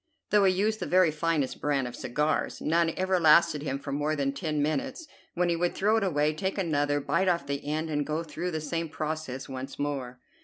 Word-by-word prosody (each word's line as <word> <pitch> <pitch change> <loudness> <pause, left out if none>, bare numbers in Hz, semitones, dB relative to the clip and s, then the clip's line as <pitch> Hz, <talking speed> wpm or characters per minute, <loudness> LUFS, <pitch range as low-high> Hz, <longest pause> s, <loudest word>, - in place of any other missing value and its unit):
Though 210 -1 +5
he 190 - +5
used 215 +3 0
the - - -3
very 180 -3 +4
finest 155 -3 -1
brand 140 -3 0
of 125 - -7
cigars, 150 +4 -1
none 165 +1 +2
ever 185 0 +1
lasted 160 -1 +5
him 140 -2 -2
for 140 0 -7
more 150 +2 0
than 140 -2 -1
ten 155 -1 -2
minutes, 265 - -1 0.3
when 175 0 +2
he 170 - +1
would 175 +1 0
throw 210 +3 +2
it 220 - +1
away, 155 -4 +1
take 190 +5 -3
another, 145 -5 +1
bite 170 +6 0
off 170 -5 +1
the 140 0 -3
end, 155 +2 -2
and 145 -1 0
go 155 +3 -2
through 170 +2 -4
the 160 -2 -3
same 165 +2 -3
process 155 -3 -4
once 130 0 -7
more. 135 -4 -3
155 Hz, 220 wpm, -28 LUFS, 145-175 Hz, 0.3 s, Though